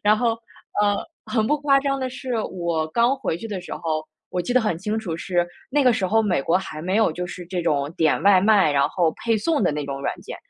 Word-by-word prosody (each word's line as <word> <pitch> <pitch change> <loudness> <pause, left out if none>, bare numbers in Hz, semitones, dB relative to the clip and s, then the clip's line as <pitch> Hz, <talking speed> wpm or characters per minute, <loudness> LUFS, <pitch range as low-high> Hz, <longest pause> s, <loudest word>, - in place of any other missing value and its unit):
然 210 +1 +4
后， 240 -2 +2 0.5
呃， 205 -1 +3 0.3
很 220 -3 0
不 300 - +2
夸 275 -1 +4
张 275 -1 -1
的 260 -1 -2
是， 255 -1 -5 0.2
我 170 -3 -1
刚 235 +10 +2
回 215 -10 -2
去 225 - -7
的 195 -3 -4
时 180 - -9
候， 155 -1 -2 0.3
我 180 - -1
记 175 - -2
得 255 - +4
很 210 -7 0
清 210 +4 -2
楚 175 -7 -4
是， 175 0 0 0.2
那 290 +1 +3
个 250 -2 +5
时 190 -4 0
候 225 +3 +3
美 180 -9 +1
国 165 - +2
还 155 -5 -7
没 185 +3 0
有 220 -6 +4
就 180 +2 -4
是 180 0 -8
这 180 -1 -3
种 145 -2 0
点 160 -2 +2
外 195 -2 +6
卖， 200 -6 +4
然 140 -1 +3
后 170 -3 +1
配 225 -1 +3
送 295 +3 0
的 175 - +3
那 150 -1 -3
种 140 0 -4
软 - - -1
件。 - - -8
190 Hz, 275 characters per minute, -23 LUFS, 170-225 Hz, 0.5 s, 外